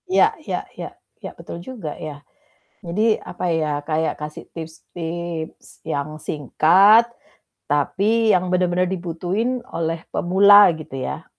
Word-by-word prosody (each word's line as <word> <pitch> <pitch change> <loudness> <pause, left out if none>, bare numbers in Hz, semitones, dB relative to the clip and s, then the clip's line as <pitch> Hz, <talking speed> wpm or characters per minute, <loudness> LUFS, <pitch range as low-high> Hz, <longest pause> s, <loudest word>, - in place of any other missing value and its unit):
Ya 415 +4 +4
ya - - -4
ya, - - -8 0.3
ya - - -6
betul 170 - -8
juga 190 - -7
ya, 145 -2 -8 0.6
jadi 210 +5 +1
apa 180 - -6
ya, 155 -2 0
kayak 160 +1 -1
kasih 150 0 -8
tips-tips 165 0 -7
yang 145 +2 -3
singkat, 180 - +4 0.6
tapi 200 +10 +1
yang 180 0 0
benar-benar 180 0 +2
dibutuhin 190 +7 -2
oleh 165 0 -2
pemula 200 +3 +6
gitu 150 -4 -8
ya. - - -5
175 Hz, 120 wpm, -21 LUFS, 160-200 Hz, 0.6 s, pemula